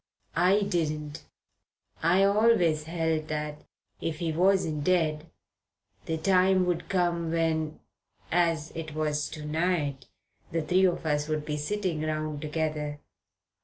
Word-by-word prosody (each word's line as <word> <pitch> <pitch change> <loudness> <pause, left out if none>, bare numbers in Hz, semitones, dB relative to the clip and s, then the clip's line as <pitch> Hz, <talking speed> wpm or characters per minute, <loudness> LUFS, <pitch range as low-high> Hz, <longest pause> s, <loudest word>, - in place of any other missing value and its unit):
I 185 +5 +4
didn't. 155 -5 -2 0.8
I 180 +4 +4
always 195 -7 +3
held 160 -1 -1
that, 150 -1 -4 0.4
if 160 -2 -2
he 165 -1 -1
wasn't 170 -3 +2
dead, 160 -2 +1 0.8
the 160 - -1
time 185 +2 +3
would 175 -1 -2
come 175 -3 +1
when, 160 -1 0 0.5
as 165 -3 +1
it 160 -2 -6
was 150 -1 -1
to 150 -2 -7
night, 150 -4 -1 0.4
the 165 -1 -1
three 185 +4 +3
of 175 -3 0
us 150 -1 0
would 155 -1 -2
be 150 - -2
sitting 175 +1 -2
round 155 -1 -2
together. 150 -1 -2
160 Hz, 130 wpm, -28 LUFS, 150-175 Hz, 0.8 s, I